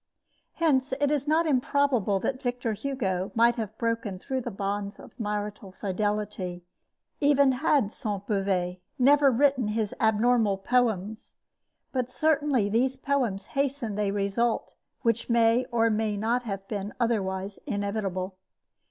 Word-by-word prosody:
Hence, 270 -5 +1
it 290 0 +2
is 290 -1 0
not 320 +2 +3
improbable 255 -7 +2
that 260 -1 -2
Victor 245 -2 -1
Hugo 200 -7 -2
might 235 +1 +5
have 220 -1 -4
broken 230 -4 -2
through 260 +7 -3
the 240 - -4
bonds 200 0 -3
of - - -12
marital 210 -2 -4
fidelity, 200 -2 -2 0.6
even 280 -2 +4
had 260 -4 +1
Sainte 200 -2 -4
Beuve 190 -3 0 0.2
never 280 +2 +5
written 265 -1 +2
his 210 -1 -1
abnormal 220 -1 +3
poems; 220 -1 -1 0.6
but 255 -2 -1
certainly 290 -6 +2
these 250 +5 +1
poems 250 -8 -1
hastened 275 -6 -1
a 205 -1 +1
result 205 +4 0 0.3
which 230 0 +1
may 235 +1 +4
or 230 -1 +3
may 215 -1 0
not 235 +4 0
have 195 -2 -5
been 205 -1 -4
otherwise 195 -4 -1
inevitable. 200 -4 -2
225 Hz, 135 wpm, -27 LUFS, 200-255 Hz, 0.6 s, might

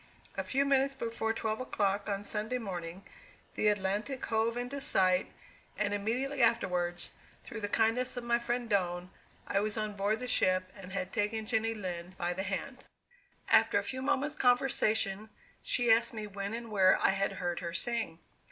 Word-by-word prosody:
A - - -1
few 275 +2 +1
minutes 275 0 +3
before 230 -3 -2
twelve 220 -1 -2
o'clock, 205 -5 0
on 200 0 -2
Sunday 215 +4 -2
morning, 185 -4 -5 0.5
the 215 - +1
Atlantic 210 +6 0
hove 225 +1 +1
in 250 +3 -4
sight, 185 -8 +2 0.5
and 205 0 0
immediately 250 +7 -1
afterwards, 180 -6 +1 0.3
through 225 - -7
the 205 - -1
kindness 230 +5 +1
of 245 - -3
my 235 0 +2
friend 240 0 -2
Doane, 180 -3 0 0.3
I 195 - +1
was 215 +2 -2
on 215 -1 -2
board 205 +2 0
the 250 - -4
ship, 185 -5 +2
and 190 -2 -10
had 185 -1 -3
taken 215 0 -1
Jenny 225 0 0
Lind 180 -2 -5
by 175 +1 -1
the 190 - -3
hand. 200 +8 -4 0.6
After - - +5
a - - +1
few 260 0 -4
moments' 290 +2 +1
conversation, 220 -6 +2 0.3
she 240 -2 +2
asked 230 +1 +3
me 215 -1 -3
when 200 +1 -4
and 230 -1 -7
where 190 -3 +5
I - - +4
had 195 0 0
heard 175 -2 -2
her 170 -1 -4
sing. 225 -4 -1
215 Hz, 175 wpm, -32 LUFS, 195-240 Hz, 0.6 s, After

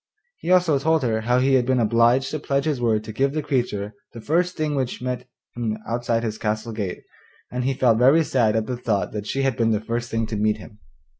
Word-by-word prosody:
He - - -5
also 175 -6 +4
told 160 +1 +2
her 110 -2 0
how 120 +3 +2
he 135 +2 +3
had 125 -2 +3
been 130 -1 +2
obliged 120 +3 +3
to 155 - -3
pledge 140 0 -1
his 145 -5 -1
word 110 -3 +1
to 110 - -7
give 135 +5 +1
the 155 -1 -2
creature 120 -7 -1 0.2
the 115 - -8
first 175 +8 0
thing 155 -1 -1
which 130 -3 -2
met 125 0 -4 0.3
him 115 -2 -2
outside 115 0 -1
his 110 -1 -3
castle 110 +1 -2
gate, 100 -5 -4 0.5
and 125 0 -2
he 135 0 0
felt 120 -3 +3
very 140 +6 +5
sad 115 -7 +1
at 110 -1 +1
the 125 +1 -4
thought 110 -5 -1
that 105 -1 -5
she 135 - -1
had 135 -3 +1
been 115 -1 +1
the 110 -2 +2
first 120 +2 -3
thing 115 0 -1
to 110 - -5
meet 105 +1 +1
him. 105 0 -13
120 Hz, 240 wpm, -23 LUFS, 110-135 Hz, 0.5 s, very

